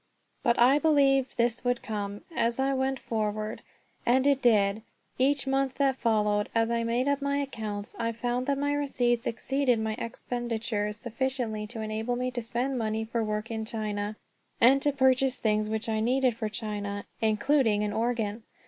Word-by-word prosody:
But 235 Hz, -2 st, +2 dB
I 260 Hz, +4 st, +5 dB
believed 275 Hz, -4 st, +3 dB
this 235 Hz, 0 st, +1 dB
would 245 Hz, -1 st, 0 dB
come 205 Hz, -2 st, -4 dB
as 230 Hz, 0 st, +1 dB
I 270 Hz, +1 st, +1 dB
went 265 Hz, 0 st, 0 dB
forward; 215 Hz, -2 st, -3 dB, 0.4 s
and 260 Hz, +2 st, +3 dB
it 280 Hz, -1 st, +3 dB
did. 210 Hz, -3 st, +3 dB, 0.4 s
Each 275 Hz, +1 st, +2 dB
month 270 Hz, -1 st, 0 dB
that 275 Hz, -2 st, +2 dB
followed, 210 Hz, -4 st, +1 dB
as 225 Hz, 0 st, +2 dB
I 235 Hz, 0 st, +1 dB
made 235 Hz, +3 st, 0 dB
up 285 Hz, 0 st, +1 dB
my 280 Hz, 0 st, 0 dB
accounts, 215 Hz, -7 st, -4 dB
I 230 Hz, 0 st, 0 dB
found 245 Hz, +3 st, -2 dB
that 280 Hz, -1 st, +1 dB
my 285 Hz, +1 st, 0 dB
receipts 245 Hz, -5 st, 0 dB
exceeded 265 Hz, +1 st, +1 dB
my 220 Hz, 0 st, -1 dB
expenditures 230 Hz, -3 st, -3 dB
sufficiently 235 Hz, -2 st, -2 dB
to 225 Hz, 0 st, -6 dB
enable 220 Hz, +3 st, -2 dB
me 250 Hz, +1 st, -2 dB
to 245 Hz, -1 st, -3 dB
spend 245 Hz, +3 st, -2 dB
money 220 Hz, 0 st, -1 dB
for 230 Hz, 0 st, -1 dB
work 215 Hz, +1 st, -3 dB
in 220 Hz, -1 st, -2 dB
China, 215 Hz, -2 st, -3 dB, 0.4 s
and 265 Hz, +4 st, +6 dB
to 290 Hz, -, +2 dB
purchase 265 Hz, -1 st, +2 dB
things 215 Hz, -1 st, +1 dB
which 220 Hz, +1 st, -2 dB
I 220 Hz, -1 st, 0 dB
needed 250 Hz, +1 st, +2 dB
for 220 Hz, -2 st, -3 dB
China, 205 Hz, -2 st, -4 dB, 0.2 s
including 220 Hz, 0 st, +2 dB
an 210 Hz, 0 st, -1 dB
organ. 225 Hz, -1 st, -1 dB
235 Hz, 175 wpm, -28 LUFS, 215-265 Hz, 0.4 s, and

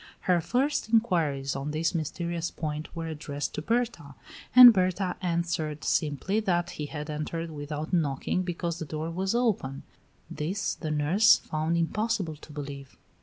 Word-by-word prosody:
Her 180 Hz, -2 st, +2 dB
first 265 Hz, -, 0 dB
inquiries 165 Hz, -, +1 dB
on 135 Hz, +2 st, -3 dB
this 155 Hz, +4 st, 0 dB
mysterious 170 Hz, +1 st, -2 dB
point 155 Hz, -1 st, -4 dB
were 165 Hz, -1 st, -4 dB
addressed 150 Hz, -2 st, -4 dB
to -, -, -3 dB
Berta 225 Hz, -, -2 dB, 0.4 s
and 250 Hz, -2 st, +12 dB
Berta 185 Hz, -1 st, 0 dB
answered 170 Hz, -4 st, -2 dB
simply 155 Hz, +7 st, 0 dB
that 175 Hz, -5 st, 0 dB
he 150 Hz, -, -5 dB
had 150 Hz, 0 st, -6 dB
entered 160 Hz, +2 st, -4 dB
without 150 Hz, +2 st, -5 dB
knocking 155 Hz, +1 st, 0 dB
because 170 Hz, -2 st, -3 dB
the 160 Hz, -, -4 dB
door 155 Hz, +2 st, -4 dB
was 190 Hz, +5 st, -1 dB
open. 200 Hz, -, 0 dB, 0.4 s
This 180 Hz, +7 st, -2 dB
the 155 Hz, -, -5 dB
nurse 155 Hz, +9 st, +5 dB
found 155 Hz, +2 st, -2 dB
impossible 195 Hz, -1 st, -1 dB
to 150 Hz, -, -14 dB
believe. 140 Hz, -2 st, -8 dB
165 Hz, 150 wpm, -28 LUFS, 150-185 Hz, 0.4 s, and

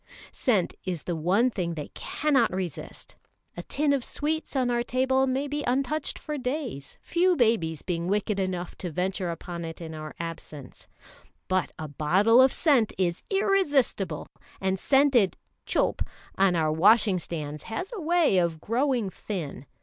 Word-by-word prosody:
Scent 210 Hz, -, +1 dB
is 180 Hz, -4 st, -4 dB
the 175 Hz, -, -2 dB
one 190 Hz, +10 st, +2 dB
thing 175 Hz, -6 st, -2 dB
they 150 Hz, -2 st, -6 dB
cannot 300 Hz, -3 st, +1 dB
resist. 185 Hz, -4 st, -6 dB, 0.4 s
A 175 Hz, -, -5 dB
tin 285 Hz, +9 st, +1 dB
of 270 Hz, -3 st, 0 dB
sweets 310 Hz, +3 st, -2 dB
on 255 Hz, -2 st, +2 dB
our 240 Hz, 0 st, +1 dB
table 260 Hz, +2 st, +1 dB
may 265 Hz, +2 st, 0 dB
be 295 Hz, +1 st, -3 dB
untouched 275 Hz, +4 st, 0 dB
for 300 Hz, -2 st, -5 dB
days, 250 Hz, -, -4 dB
few 360 Hz, +1 st, +2 dB
babies 220 Hz, -, +1 dB
being 170 Hz, -1 st, -2 dB
wicked 205 Hz, +1 st, 0 dB
enough 180 Hz, -2 st, -3 dB
to 180 Hz, -, -3 dB
venture 185 Hz, +2 st, -2 dB
upon 170 Hz, 0 st, -5 dB
it 165 Hz, 0 st, -6 dB
in 160 Hz, -2 st, -7 dB
our 155 Hz, -1 st, -7 dB
absence; 160 Hz, -5 st, -8 dB, 0.6 s
but 185 Hz, 0 st, +1 dB
a 155 Hz, -, -5 dB
bottle 190 Hz, -, +4 dB
of 260 Hz, 0 st, +6 dB
scent 270 Hz, -9 st, +2 dB
is 175 Hz, -2 st, 0 dB
irresistible, 290 Hz, -, +1 dB, 0.3 s
and 190 Hz, 0 st, 0 dB
scented 270 Hz, -7 st, +3 dB, 0.3 s
"chope" -, -, +1 dB, 0.3 s
on 190 Hz, -2 st, +3 dB
our 155 Hz, -2 st, +2 dB
washing 200 Hz, +3 st, +4 dB
stands 150 Hz, -3 st, -5 dB
has 360 Hz, -, -4 dB
a 420 Hz, -, -5 dB
way 325 Hz, -, +3 dB
of 170 Hz, -2 st, 0 dB
growing 240 Hz, -, 0 dB
thin. 155 Hz, -11 st, -6 dB
200 Hz, 155 wpm, -27 LUFS, 170-265 Hz, 0.6 s, of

